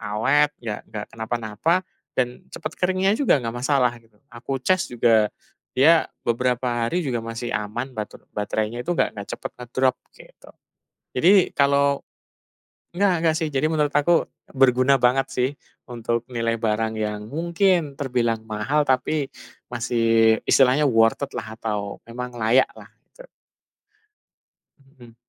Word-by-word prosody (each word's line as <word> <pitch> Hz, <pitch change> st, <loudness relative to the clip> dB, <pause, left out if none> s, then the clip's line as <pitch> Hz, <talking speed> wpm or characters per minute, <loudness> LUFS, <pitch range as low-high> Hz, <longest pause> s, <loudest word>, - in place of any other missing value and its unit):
awet, 135 Hz, +8 st, +2 dB
nggak, 110 Hz, -3 st, -5 dB
ya -, -, -28 dB
nggak 105 Hz, -1 st, -5 dB
kenapa-napa, 115 Hz, -, -1 dB, 0.3 s
dan 125 Hz, -1 st, -2 dB
cepet 155 Hz, -, -6 dB
keringnya 185 Hz, +2 st, +2 dB
juga. 275 Hz, -, +4 dB
Nggak 115 Hz, 0 st, -4 dB
masalah, 130 Hz, -2 st, +2 dB
gitu. 115 Hz, -2 st, -28 dB, 0.2 s
Aku 125 Hz, +3 st, -4 dB
cas 185 Hz, +2 st, +2 dB
juga, 115 Hz, -3 st, +3 dB, 0.5 s
dia 160 Hz, +5 st, +5 dB, 0.2 s
beberapa 120 Hz, 0 st, 0 dB
hari 175 Hz, +8 st, -1 dB
juga 125 Hz, -4 st, -1 dB
masih 115 Hz, +1 st, -5 dB
aman. 115 Hz, +5 st, -3 dB
Bater 110 Hz, -3 st, -7 dB
baterainya 110 Hz, +3 st, -2 dB
itu 175 Hz, +7 st, -2 dB
nggak 100 Hz, -1 st, -1 dB
cepet -, -, -6 dB
ngedrop, 130 Hz, +2 st, 0 dB, 0.2 s
gitu. -, -, -17 dB, 0.7 s
Jadi, 185 Hz, +8 st, +5 dB
kalau 140 Hz, 0 st, +3 dB, 0.9 s
nggak 200 Hz, -1 st, +3 dB
nggak 160 Hz, -1 st, +2 dB
sih. 160 Hz, -, -1 dB
Jadi 135 Hz, +3 st, +1 dB
menurut 150 Hz, -2 st, 0 dB
aku, 160 Hz, +4 st, +3 dB, 0.3 s
berguna 130 Hz, 0 st, +4 dB
banget 130 Hz, +2 st, +2 dB
sih. 125 Hz, 0 st, 0 dB, 0.4 s
Untuk 120 Hz, -1 st, -3 dB
nilai 115 Hz, -2 st, -2 dB
barang 110 Hz, 0 st, 0 dB
yang, 105 Hz, -1 st, -3 dB
mungkin 170 Hz, -1 st, +1 dB
terbilang 120 Hz, -5 st, -1 dB
mahal, 110 Hz, +8 st, 0 dB
tapi, 135 Hz, +3 st, +1 dB, 0.4 s
masih, 115 Hz, -2 st, +2 dB
istilahnya 135 Hz, +3 st, +4 dB
worth 115 Hz, 0 st, +3 dB
it -, -, -25 dB
lah. 110 Hz, -2 st, -6 dB
Atau 105 Hz, -2 st, -3 dB
memang 125 Hz, +1 st, -6 dB
layak 115 Hz, +4 st, +3 dB
lah. -, -, -13 dB, 0.3 s
Tu. -, -, -13 dB, 1.5 s
Mhm. 130 Hz, -4 st, -18 dB
125 Hz, 140 wpm, -23 LUFS, 115-145 Hz, 1.5 s, dia